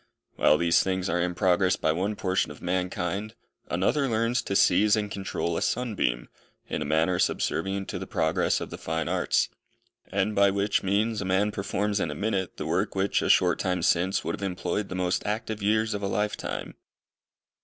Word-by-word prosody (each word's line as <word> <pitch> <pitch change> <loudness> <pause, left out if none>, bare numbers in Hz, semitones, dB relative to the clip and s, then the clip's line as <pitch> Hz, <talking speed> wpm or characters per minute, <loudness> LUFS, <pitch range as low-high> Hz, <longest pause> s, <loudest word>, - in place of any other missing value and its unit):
While 75 - +4
these 85 +1 +3
things 95 0 -1
are 85 +1 +1
in 90 0 -1
progress 95 +1 +3
by 80 - +1
one 95 +6 -1
portion 95 -4 0
of 75 - -10
mankind, 90 +4 -2 0.3
another 130 - +1
learns 115 +2 +1
to 100 - -3
seize 105 +1 +5
and 105 -1 -2
control 95 -3 -3
a - - -2
sunbeam, 105 - -1 0.4
in - - -3
a - - -2
manner 80 +4 +1
subservient 95 +1 0
to - - -4
the - - -6
progress - - +1
of - - -6
the - - -7
fine 80 -1 -2
arts: 90 +1 +1 0.6
and 100 +2 0
by 100 -1 +5
which 100 +1 +1
means 105 +3 0
a - - -3
man 95 +3 +2
performs 105 +1 -1
in 85 - -1
a 75 - -4
minute, 100 +1 -2
the - - -4
work 95 +6 -1
which 95 +1 +1
a - - -1
short - - +4
time 90 -2 -1
since 95 +3 +2
would - - -2
have - - -6
employed 95 +1 -2
the 95 - -5
most 90 -1 0
active 110 0 -3
years 110 +2 +1
of 105 - -3
a 100 - -1
lifetime. 105 +2 -3
95 Hz, 195 wpm, -27 LUFS, 90-105 Hz, 0.6 s, seize